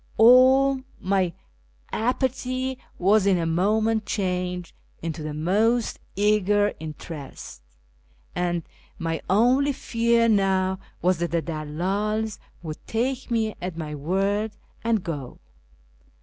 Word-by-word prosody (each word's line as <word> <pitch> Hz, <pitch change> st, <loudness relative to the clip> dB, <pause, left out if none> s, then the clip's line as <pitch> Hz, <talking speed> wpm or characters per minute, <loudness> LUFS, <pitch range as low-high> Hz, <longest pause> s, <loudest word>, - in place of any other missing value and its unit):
All 260 Hz, +3 st, +6 dB, 0.2 s
my 190 Hz, -2 st, +1 dB, 0.6 s
apathy 255 Hz, +2 st, -1 dB, 0.2 s
was 200 Hz, +2 st, +4 dB
in 190 Hz, -2 st, +4 dB
a 170 Hz, -, -1 dB
moment 215 Hz, +5 st, +1 dB
changed 180 Hz, -3 st, -2 dB, 0.3 s
into 160 Hz, -1 st, -3 dB
the 150 Hz, -1 st, -4 dB
most 215 Hz, +9 st, +1 dB, 0.2 s
eager 205 Hz, 0 st, +3 dB
interest, 150 Hz, -, -8 dB, 0.7 s
and 175 Hz, -1 st, -1 dB, 0.3 s
my 165 Hz, -1 st, -2 dB
only 250 Hz, +8 st, +4 dB
fear 230 Hz, -2 st, +2 dB
now 190 Hz, -3 st, +2 dB, 0.2 s
was 180 Hz, -1 st, +3 dB
that 170 Hz, 0 st, -1 dB
the 170 Hz, -1 st, 0 dB
dalldls 190 Hz, +8 st, -2 dB, 0.2 s
would 155 Hz, -2 st, -7 dB
take 255 Hz, +4 st, -1 dB
me 220 Hz, -2 st, 0 dB
at 180 Hz, -2 st, -4 dB
my 155 Hz, -2 st, -4 dB
word 195 Hz, +8 st, 0 dB, 0.3 s
and 225 Hz, -4 st, +1 dB
go. 145 Hz, -8 st, -5 dB
195 Hz, 110 wpm, -25 LUFS, 170-225 Hz, 0.7 s, All